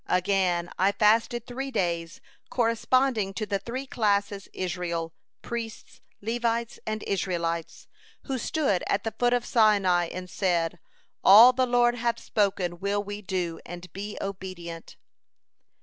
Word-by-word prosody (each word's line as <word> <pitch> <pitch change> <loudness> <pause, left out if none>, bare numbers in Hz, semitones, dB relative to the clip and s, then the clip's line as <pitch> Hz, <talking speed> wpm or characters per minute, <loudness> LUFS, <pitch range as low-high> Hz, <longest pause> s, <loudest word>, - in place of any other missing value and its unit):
Again, 180 -2 +1
I 195 +2 +3
fasted 225 +3 +2
three 265 +2 -5
days 170 -7 -2 0.3
corresponding 230 -3 +1
to 215 - -2
the 200 -1 -1
three 255 +5 -5
classes 205 -5 0
Israel, 170 -3 -3 0.3
priests, 230 -2 -6 0.2
Levites, 235 +1 -1
and 215 0 -3
Israelites, 170 -4 -2 0.4
who 265 -2 -3
stood 255 - 0
at 200 - 0
the 225 - -3
foot 245 0 +3
of 245 -1 +1
Sinai, 195 -6 +3
and 185 0 -6
said: 175 -2 0 0.4
'All 225 +6 +9
the 255 0 +1
Lord 240 0 +3
hath 235 -1 -1
spoken 190 -4 -1
will 200 +2 -1
we 205 0 -6
do, 180 -4 -3
and 175 -1 -10
be 205 +2 -6
obedient.'" 185 -4 -7
200 Hz, 135 wpm, -27 LUFS, 180-235 Hz, 0.4 s, All